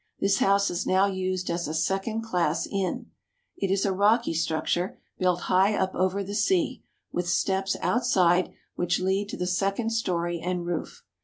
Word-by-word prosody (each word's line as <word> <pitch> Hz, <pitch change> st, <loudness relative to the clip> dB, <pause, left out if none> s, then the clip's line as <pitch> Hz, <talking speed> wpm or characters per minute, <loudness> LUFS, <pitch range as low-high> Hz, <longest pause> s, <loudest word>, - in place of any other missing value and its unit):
This 195 Hz, 0 st, +2 dB
house 200 Hz, 0 st, +3 dB
is 175 Hz, +2 st, -3 dB
now 190 Hz, +1 st, +4 dB
used 185 Hz, -1 st, -2 dB
as 170 Hz, -1 st, -2 dB
a 155 Hz, -, -3 dB
second 195 Hz, +7 st, -1 dB
class 175 Hz, -7 st, 0 dB
inn. 195 Hz, -2 st, -3 dB, 0.4 s
It 195 Hz, -, -2 dB
is 195 Hz, +1 st, +1 dB
a 195 Hz, -, +1 dB
rocky 210 Hz, +2 st, +3 dB
structure, 165 Hz, +3 st, -1 dB, 0.2 s
built 180 Hz, -1 st, +1 dB
high 190 Hz, +3 st, +3 dB
up 190 Hz, -1 st, 0 dB
over 185 Hz, +2 st, 0 dB
the 200 Hz, +1 st, -6 dB
sea, 345 Hz, -, +1 dB, 0.3 s
with 175 Hz, 0 st, -2 dB
steps 190 Hz, +2 st, 0 dB
outside 185 Hz, -7 st, +2 dB, 0.2 s
which 175 Hz, 0 st, 0 dB
lead 190 Hz, +2 st, 0 dB
to -, -, -5 dB
the 180 Hz, -, -2 dB
second 195 Hz, +5 st, 0 dB
story 175 Hz, -6 st, -1 dB
and 180 Hz, 0 st, -3 dB
roof. 175 Hz, -2 st, -4 dB
190 Hz, 170 wpm, -26 LUFS, 175-200 Hz, 0.4 s, now